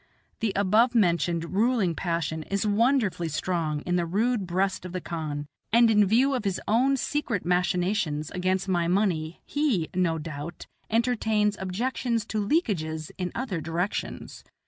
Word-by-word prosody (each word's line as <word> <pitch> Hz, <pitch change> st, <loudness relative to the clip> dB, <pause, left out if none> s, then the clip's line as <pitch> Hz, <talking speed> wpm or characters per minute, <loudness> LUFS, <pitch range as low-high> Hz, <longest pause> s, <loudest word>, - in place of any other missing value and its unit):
The 225 Hz, -3 st, 0 dB
above 215 Hz, +5 st, +3 dB
mentioned 170 Hz, -4 st, +1 dB
ruling 215 Hz, -3 st, +2 dB
passion 165 Hz, -2 st, -2 dB
is 200 Hz, +2 st, 0 dB
wonderfully 210 Hz, -5 st, +2 dB
strong 155 Hz, -1 st, -1 dB
in 180 Hz, +2 st, 0 dB
the 175 Hz, -, +1 dB
rude 210 Hz, +2 st, 0 dB
breast 190 Hz, +2 st, 0 dB
of 180 Hz, -1 st, -7 dB
the 185 Hz, -, -2 dB
khan, 155 Hz, -4 st, -4 dB, 0.3 s
and 230 Hz, 0 st, +6 dB
in 210 Hz, -2 st, +5 dB
view 255 Hz, +7 st, +3 dB
of 255 Hz, -, -1 dB
his 195 Hz, -3 st, -1 dB
own 260 Hz, +5 st, +3 dB
secret 255 Hz, -9 st, -2 dB
machinations 180 Hz, -3 st, 0 dB
against 185 Hz, +1 st, 0 dB
my 175 Hz, -3 st, +1 dB
money 175 Hz, -4 st, 0 dB
he, 270 Hz, -, 0 dB
no 175 Hz, -3 st, +1 dB
doubt, 155 Hz, +1 st, -7 dB, 0.2 s
entertains 220 Hz, -3 st, +1 dB
objections 230 Hz, +4 st, -1 dB
to 215 Hz, -1 st, -1 dB
leakages 165 Hz, -, -1 dB
in 180 Hz, -1 st, -2 dB
other 215 Hz, -10 st, -3 dB
directions. 165 Hz, +5 st, -3 dB
190 Hz, 145 wpm, -26 LUFS, 170-225 Hz, 0.3 s, and